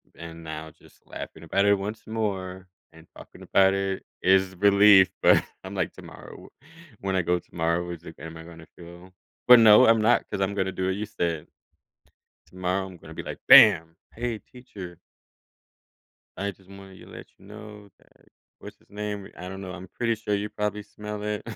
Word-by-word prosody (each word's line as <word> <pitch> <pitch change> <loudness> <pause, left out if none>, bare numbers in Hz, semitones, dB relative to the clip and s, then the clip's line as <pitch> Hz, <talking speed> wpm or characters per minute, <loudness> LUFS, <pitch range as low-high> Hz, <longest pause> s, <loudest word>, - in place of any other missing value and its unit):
and 85 0 -10
now, 80 0 -7
just 80 - -22
laughing - - -9
about 100 +1 0
it 100 - +5
once 105 +3 -6
more, 95 -4 -4 0.3
and 80 +1 -17
talking - - -14
about 95 0 +3
it 95 -1 -3 0.2
is 95 0 +2
relief, 100 -1 +6
but, - - +5 0.2
I'm 95 +1 -8
like, 95 -4 -2
"Tomorrow, - - -13
wh - - -28 0.4
when 95 -1 -1
I 90 - +1
go 90 +1 0
tomorrow, 85 +1 -2
is 85 -1 -8
it 80 - -12
g - - -16
am 80 +1 -9
I 80 - -10
gonna 85 -1 -14
feel?" 85 +2 -14 0.3
But, 125 0 +10
no, 110 -1 +7
I'm 115 -1 +5
not, 115 +3 +2
'cause 100 - -4
I'm 95 +1 0
gonna 95 -1 -1
do 95 - -3
what 95 - -1
you 105 +1 -5
said 85 -6 -3 1.0
Tomorrow, 95 +1 -3
I'm 95 -2 -12
gonna - - -13
be - - -7
like, - - -7
"Bam! 85 -5 +7 0.2
Hey, 115 -1 -4
teacher" 100 -10 -12 1.4
"I 100 +1 -2
just 95 0 -23
wanted 95 -1 -13
you - - -14
to - - -16
let - - -10
you 95 - -18
know 105 0 -12
that - - -28 0.3
what's-his-name, 105 -1 -8
wh - - -15
I 90 - -7
don't 95 0 -8
know, 95 -2 -7
I'm 95 0 -9
pretty 115 +4 -2
sure 105 -2 -2
you 105 +1 -3
probably 105 0 -3
smell 105 0 -8
it." 105 0 -3
95 Hz, 195 wpm, -25 LUFS, 90-105 Hz, 1.4 s, But